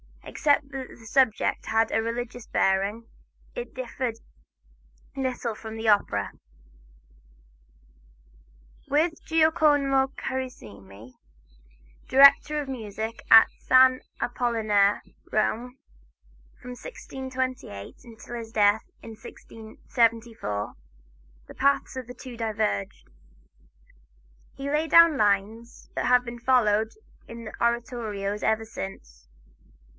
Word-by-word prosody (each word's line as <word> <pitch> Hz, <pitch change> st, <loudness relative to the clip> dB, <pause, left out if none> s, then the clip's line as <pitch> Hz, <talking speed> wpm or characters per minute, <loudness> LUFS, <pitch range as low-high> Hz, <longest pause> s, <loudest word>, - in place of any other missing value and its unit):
Except 285 Hz, -1 st, 0 dB
that 265 Hz, -2 st, -6 dB
the 225 Hz, -, -15 dB
subject 230 Hz, -1 st, +1 dB
had 225 Hz, 0 st, +1 dB
a 225 Hz, -, +1 dB
religious 240 Hz, +1 st, -5 dB
bearing, 195 Hz, +4 st, 0 dB, 0.5 s
it -, -, -7 dB
differed 260 Hz, -, -4 dB, 1.0 s
little 255 Hz, -3 st, -2 dB
from 220 Hz, +1 st, -9 dB
the 225 Hz, 0 st, -1 dB
opera. 100 Hz, -, +1 dB, 2.6 s
With 320 Hz, +3 st, 0 dB
Giacomo 295 Hz, -4 st, +3 dB
Carissimi, 110 Hz, -, -7 dB, 0.9 s
director 280 Hz, +2 st, +6 dB
of 290 Hz, -, -5 dB
music 220 Hz, -2 st, -5 dB
at 225 Hz, 0 st, +9 dB
San 255 Hz, 0 st, +5 dB, 0.2 s
Apollinare, 215 Hz, -5 st, +1 dB, 0.3 s
Rome, 240 Hz, +4 st, -1 dB, 0.8 s
from 250 Hz, -, -9 dB
1628 260 Hz, -, -6 dB
until 235 Hz, +1 st, -11 dB
his 225 Hz, -1 st, -7 dB
death, 210 Hz, -1 st, +3 dB, 0.2 s
in 225 Hz, -, -9 dB
1674, 225 Hz, -, -3 dB, 0.7 s
the -, -, -11 dB
paths 280 Hz, -1 st, +1 dB
of 255 Hz, -2 st, -6 dB
the 250 Hz, -, -10 dB
two 250 Hz, -1 st, -10 dB
diverged. 100 Hz, -, -2 dB, 1.5 s
He 275 Hz, +1 st, -5 dB
laid 310 Hz, +2 st, 0 dB
down 335 Hz, -3 st, +7 dB
lines 215 Hz, +2 st, -1 dB
that -, -, -2 dB
have 250 Hz, 0 st, +4 dB
been 240 Hz, 0 st, -7 dB
followed 220 Hz, -4 st, +2 dB, 0.4 s
in 230 Hz, 0 st, -9 dB
the 215 Hz, -, -8 dB
oratorio 230 Hz, -4 st, -2 dB
ever 220 Hz, 0 st, +1 dB
since. 65 Hz, -, -9 dB
235 Hz, 100 wpm, -26 LUFS, 215-260 Hz, 2.6 s, at